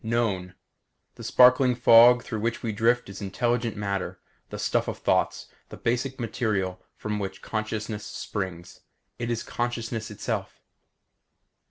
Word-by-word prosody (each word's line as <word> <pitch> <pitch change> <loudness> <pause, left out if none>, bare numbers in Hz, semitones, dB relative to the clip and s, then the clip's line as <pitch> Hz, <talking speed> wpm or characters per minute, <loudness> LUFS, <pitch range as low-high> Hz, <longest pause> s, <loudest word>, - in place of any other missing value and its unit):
Known: 105 -6 -1 0.6
This - - -8
sparkling 125 0 +6
fog 120 0 +7
through 110 - -4
which 115 +2 -2
we 115 - -1
drift 115 +3 +2
is 100 +1 -9
intelligent 115 +3 -1
matter; 100 -2 -3 0.3
the - - -6
stuff - - 0
of - - -3
thoughts; - - +1 0.2
the - - -9
basic 125 +3 -1
material 105 -6 -1
from 105 -1 -3
which 95 -1 -5
consciousness 110 -1 -3
springs. 95 -4 -5 0.4
It 120 -1 -2
is 120 -1 -1
consciousness 115 -2 -3
itself. 105 - -4
110 Hz, 135 wpm, -26 LUFS, 100-120 Hz, 0.6 s, fog